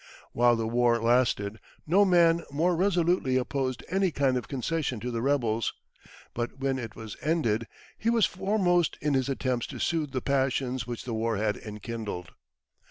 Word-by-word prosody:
While 120 0 +4
the 115 -1 -2
war 120 0 +3
lasted, 115 -3 +1 0.3
no 195 +6 +4
man 170 -2 +4
more 165 +5 +1
resolutely 175 -7 +2
opposed 130 -1 -2
any 190 +1 +1
kind 135 -4 +1
of 125 - -3
concession 135 -2 -2
to 125 +3 -4
the 115 -1 -2
rebels; 120 -5 +1 0.6
but 120 +2 -4
when 135 0 -1
it 115 -3 -7
was 110 -3 -8
ended, 120 -9 0 0.3
he 225 - +1
was 230 -3 +4
foremost 185 -3 +1
in 150 -1 0
his 135 0 +1
attempts 130 -3 -1
to - - -8
soothe 160 -4 0
the 130 - -2
passions 130 -3 0
which 120 -1 -5
the 120 - -4
war 115 0 0
had 105 0 0
enkindled. 105 -4 -6
130 Hz, 165 wpm, -28 LUFS, 115-165 Hz, 0.6 s, While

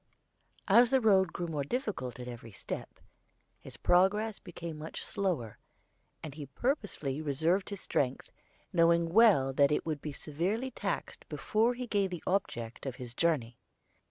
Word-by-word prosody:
As 235 +4 +6
the 265 0 +4
road 190 -6 +4
grew 175 - -3
more 155 -4 -2
difficult 145 - -3
at 125 - -6
every 120 -2 -8
step, 95 - -7 0.6
his - - -12
progress 205 +4 +3
became 170 -2 -7
much 155 +1 -5
slower, 165 - -2 0.6
and 155 - -6
he 145 -1 -8
purposely 155 - -2
reserved 160 +6 +1
his 200 -2 -6
strength, 130 -1 -1 0.4
knowing 170 0 +4
well 195 - +6
that 140 +2 +4
it 150 - 0
would 155 -3 -3
be 150 - -4
severely 185 - -2
taxed - - -4
before 230 +3 +1
he 250 +1 -4
gained 200 -4 +1
the 175 -3 -6
object 120 - -2
of 130 - -4
his 125 -2 -7
journey. 125 -6 0
170 Hz, 155 wpm, -31 LUFS, 140-205 Hz, 0.6 s, As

